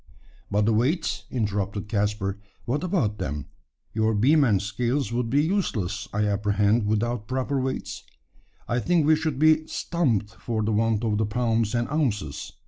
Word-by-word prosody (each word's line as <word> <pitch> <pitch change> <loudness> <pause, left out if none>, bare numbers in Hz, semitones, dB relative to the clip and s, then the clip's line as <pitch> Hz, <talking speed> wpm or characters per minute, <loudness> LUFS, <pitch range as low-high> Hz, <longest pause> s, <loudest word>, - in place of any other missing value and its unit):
"But 105 +1 +2
the 115 - +3
weights?" 135 +10 0
interrupted 105 -3 -2
Caspar. 105 -2 -1 0.3
"What 140 +7 -1
about 135 - 0
them? 75 -1 -3 0.5
Your 110 0 +1
beam 145 +8 +4
and 105 -7 +3
scales 115 +5 -1
would 120 -1 -1
be 140 +4 +3
useless, 160 - -1
I 105 +1 0
apprehend, 105 +1 +2
without 110 +1 -1
proper 130 +1 -1
weights? 130 0 -4 0.7
I 120 - 0
think 170 +3 +2
we 155 +1 +5
should 155 -3 -2
be 155 +2 +6
`stumped' 150 - -1
for 110 -2 -2
the 110 - 0
want 110 +1 +1
of 105 -2 0
the 110 - +1
pounds 115 0 0
and 120 0 0
ounces." 115 - -2
115 Hz, 160 wpm, -25 LUFS, 105-135 Hz, 0.7 s, be